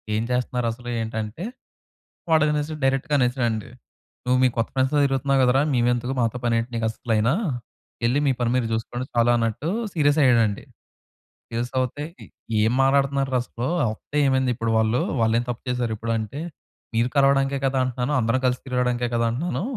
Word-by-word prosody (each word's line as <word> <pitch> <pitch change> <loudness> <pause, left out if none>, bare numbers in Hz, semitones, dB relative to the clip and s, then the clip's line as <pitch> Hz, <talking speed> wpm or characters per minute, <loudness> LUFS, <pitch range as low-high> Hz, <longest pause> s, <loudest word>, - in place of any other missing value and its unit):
ఏం 110 - 0
చేస్తున్నారసలు? 125 -1 -2
ఏంటంటే. 110 +6 -4 0.9
వాడనేసి 150 -1 +2
డైరెక్ట్‌గా 135 +2 +1
అనేసాడండి. 120 -3 0 0.6
"నువ్వు 125 +1 +3
మీ - - +6
కొత్త 115 - 0
ఫ్రెండ్స్‌తో 135 +2 +2
తిరుగుతున్నావు 135 0 +1
గదరా 130 +2 +4
మేమెందుకు 120 +1 +1
మాతో 115 0 0
పని 120 -1 +2
ఏంటి 115 +2 -4
నీకు 115 -1 -1
అస్సలయినా? 115 +1 0 0.7
యెళ్ళి 120 +4 +2
మీ - - +4
పని 120 -1 +1
మీరు 125 -2 +1
చూసుకోండి 120 +3 -3
చాలు" 120 0 +3
అన్నట్టు 115 +6 -1 0.2
సీరియస్ 145 -2 +3
అయ్యాడండి. 115 -5 +3 0.9
సీరియస్ 120 +1 -3
అవుతే 130 +3 -2 0.6
ఏం 110 +2 +2
మాటాడతన్నార్రా 135 -1 +2
అసలు? 120 0 -5 0.3
వస్తే 145 +6 -7
ఏమైంది 130 -1 +2
ఇప్పుడు 115 -1 -1
వాళ్ళు? 110 +2 +2 0.2
వాళ్ళేం 115 +1 +2
తప్పు 120 -1 -4
చేసారిప్పుడు? 115 -2 -2
అంటే 110 +7 -5 0.5
మీరు 115 +2 +2
కలవడానికే 135 0 +3
కదా! 135 0 0
అంటున్నాను. 125 +3 -2
అందరం 115 +3 +1
కలిసి 125 0 -1
తిరగడానికే 125 -1 0
కదా! 115 0 +2
అంటున్నాను. 170 +8 -2
125 Hz, 150 wpm, -24 LUFS, 115-135 Hz, 0.9 s, మీ